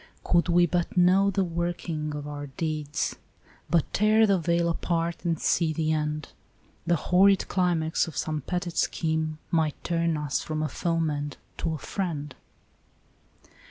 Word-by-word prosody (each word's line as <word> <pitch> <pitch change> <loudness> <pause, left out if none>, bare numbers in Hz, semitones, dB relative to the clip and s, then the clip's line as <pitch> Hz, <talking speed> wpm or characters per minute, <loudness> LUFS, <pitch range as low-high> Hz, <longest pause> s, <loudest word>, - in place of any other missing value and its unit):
u - - -21 0.3
Could 175 0 +4
we 175 0 +5
but 175 +1 -1
know 185 +3 +5
the 195 0 +1
working 170 -3 -3
of 145 0 -5
our 145 -1 -6
deeds, 150 +1 -3 0.5
But 165 -3 +1
tear 215 +2 +4
the 200 -3 +3
veil 170 0 +1
apart 170 0 -1
and 165 -3 0
see 165 -2 +2
the 155 0 0
end. 150 -1 -2 0.6
The 170 - +4
horrid 190 +4 +4
climax 170 -3 +1
of 165 - -8
some 155 -1 -1
petted 175 +3 -3
scheme 160 -1 0
Might 160 -3 0
turn 165 -2 0
us 150 -3 -1
from 155 0 -3
a 155 - -1
foeman 155 -4 -1 0.2
to 165 -1 -1
a - - -5
friend." 150 -5 -4
165 Hz, 155 wpm, -27 LUFS, 155-175 Hz, 0.6 s, we